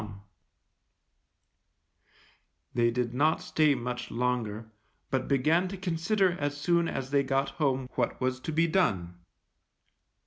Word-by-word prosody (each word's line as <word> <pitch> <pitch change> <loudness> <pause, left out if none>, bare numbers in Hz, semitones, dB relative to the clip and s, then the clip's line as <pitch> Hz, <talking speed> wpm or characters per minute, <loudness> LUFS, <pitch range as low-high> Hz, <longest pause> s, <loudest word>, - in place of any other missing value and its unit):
_ 105 -2 -9 2.5
They 120 -1 +3
did 120 0 -1
not 155 +5 +2
stay 155 -2 +2
much 125 0 -4
longer, 115 -2 -2 0.4
but 130 0 0
began 155 +7 +2
to 195 +1 -6
consider 185 +2 +1
as 145 0 -2
soon 170 +3 +2
as 135 -3 -4
they 140 -1 +4
got 135 0 0
home 135 -3 +1
what - - -1
was 130 0 -1
to 160 - -5
be 165 +2 +3
done. 95 - 0
135 Hz, 130 wpm, -29 LUFS, 125-160 Hz, 2.5 s, they